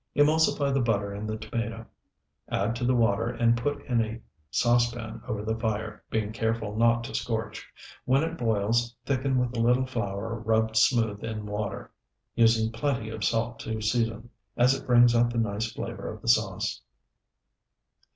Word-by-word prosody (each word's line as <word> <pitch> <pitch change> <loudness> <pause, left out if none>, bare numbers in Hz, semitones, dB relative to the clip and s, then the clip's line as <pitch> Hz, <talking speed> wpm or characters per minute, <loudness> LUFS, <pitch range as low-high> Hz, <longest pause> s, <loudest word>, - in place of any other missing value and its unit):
Emulsify 150 -1 +3
the 135 - +2
butter 100 -4 0
in 105 +2 -5
the 110 0 -3
tomato, 115 +1 -4 0.6
add 105 +4 0
to 120 - -4
the 125 +1 +3
water, 115 -1 +2
and 115 -1 +2
put 145 +5 -2
in 120 -3 +1
a 110 +1 -6 0.3
saucepan 120 - +1
over 105 0 -3
the 110 +1 0
fire, 110 -1 -3
being 110 -1 -1
careful 115 -2 -2
not 115 +1 +3
to - - -7
scorch. - - -3 0.3
When 135 +3 +3
it 165 0 -2
boils, 115 -1 0
thicken 135 -1 0
with 125 -1 0
a - - -2
little 125 +3 +3
flour 115 -2 -3
rubbed 110 0 +1
smooth 110 -2 +2
in 110 -2 -4
water, 105 -1 -4 0.4
using 115 -1 +3
plenty 115 -2 -2
of 110 -2 -5
salt 115 +2 0
to 110 -1 -4
season, 115 +1 -1 0.3
as 125 +2 +5
it 135 - -6
brings 120 -1 +6
out 120 0 +3
the 120 - -4
nice 110 0 -1
flavor - - -5
of - - -11
the - - -1
sauce. - - +1
115 Hz, 170 wpm, -27 LUFS, 110-120 Hz, 0.6 s, brings